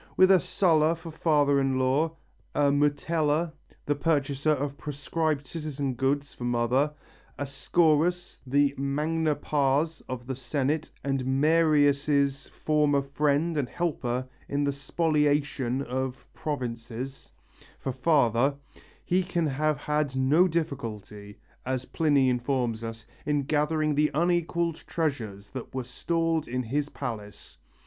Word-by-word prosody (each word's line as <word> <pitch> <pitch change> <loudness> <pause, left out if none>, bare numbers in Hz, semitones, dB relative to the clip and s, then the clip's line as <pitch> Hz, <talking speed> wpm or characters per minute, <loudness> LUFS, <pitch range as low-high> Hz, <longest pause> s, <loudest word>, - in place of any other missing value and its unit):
With 185 +1 +7
a 190 - +7
Sulla 160 -1 +2
for 165 0 -9
father 145 -3 +3
in 135 -1 +1
law, 135 +5 +2 0.4
a 145 -1 +3
Metella, 150 +2 +1 0.3
the 145 - +2
purchaser 145 -1 0
of 145 -1 0
proscribed 150 +1 -2
citizens' 145 -4 -4
goods, 140 +3 0
for - - -9
mother, 120 +4 +1 0.5
a 145 - -2
Scaurus, 165 +5 +1
the 140 +1 +3
magna 150 +3 0
pars 145 +2 0
of 125 -1 -5
the 130 - -3
Senate 140 +4 -1
and 135 -2 -1
Marius' 145 -1 +3
former 150 -2 +1
friend 145 +4 +1
and 130 -3 -2
helper 130 -7 -2 0.2
in 140 +1 0
the 140 - +1
spoliation 145 -3 0
of 130 0 -4
provinces, 125 -2 -5 0.5
for 135 - -3
father, 135 -1 +2 0.5
he 180 +2 +2
can 175 -2 -1
have 150 +1 0
had 150 -2 -1
no 145 +8 +4
difficulty, 110 - -4 0.3
as 130 0 -2
Pliny 145 -4 +2
informs 125 -2 0
us, 115 -1 -6 0.2
in 145 -1 +1
gathering 150 +1 +1
the 150 +1 +3
unequalled 170 0 +1
treasures 110 - -3
that 130 0 -7
were 130 - -1
stored 165 +5 -1
in 125 +1 -2
his 145 +5 -1
palace. 110 -8 -7
145 Hz, 125 wpm, -27 LUFS, 130-155 Hz, 0.5 s, With